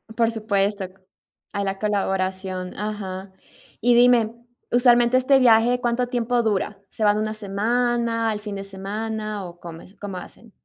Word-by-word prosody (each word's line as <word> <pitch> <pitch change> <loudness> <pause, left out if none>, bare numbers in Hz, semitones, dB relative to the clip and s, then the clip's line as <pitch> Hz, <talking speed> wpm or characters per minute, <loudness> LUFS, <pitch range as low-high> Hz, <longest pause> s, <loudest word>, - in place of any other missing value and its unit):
Por 230 -1 +3
supuesto, 205 -3 -1 0.7
a 200 - -1
la 195 0 -1
colaboración, 190 -2 -2
ajá. 195 -2 -5 0.5
Y 240 +1 +4
dime, 240 -2 +5 0.4
usualmente 240 0 +5
este 265 +1 +4
viaje, 240 0 +5
¿cuánto 245 +1 0
tiempo 245 -1 0
dura? 205 -1 -1
¿Se 220 - -4
van 205 0 +4
una 215 0 -1
semana, 230 +2 0
el 210 - -4
fin 210 -1 -6
de 195 - -5
semana 210 +1 -4
o 175 0 -11
cómo 165 -1 -9
es 195 - -17
cómo 195 -2 -6
hacen? 225 +4 -11
215 Hz, 150 wpm, -23 LUFS, 195-235 Hz, 0.7 s, dime